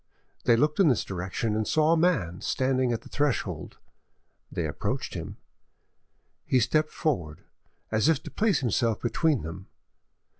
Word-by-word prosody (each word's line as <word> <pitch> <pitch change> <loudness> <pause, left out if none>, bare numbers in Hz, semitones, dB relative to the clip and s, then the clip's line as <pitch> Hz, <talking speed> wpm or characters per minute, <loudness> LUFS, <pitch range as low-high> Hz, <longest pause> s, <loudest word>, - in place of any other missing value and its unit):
They 115 - +6
looked 150 +8 +1
in 190 - +6
this 130 -6 +3
direction, 95 +4 -3
and 110 0 -1
saw 155 0 +3
a - - +4
man 130 - +1
standing 130 -1 +1
at 115 - -2
the - - -12
threshold; 145 -3 -2 0.7
they - - -2
approached - - -3
him. - - -6 1.1
He 130 - +2
stepped 155 +6 +2
forward, 85 - -2 0.5
as 110 +7 +3
if 155 -2 +2
to - - -8
place 215 -6 +1
himself 115 -2 +1
between 145 +2 +1
them. 90 +5 -7
125 Hz, 150 wpm, -27 LUFS, 105-155 Hz, 1.1 s, They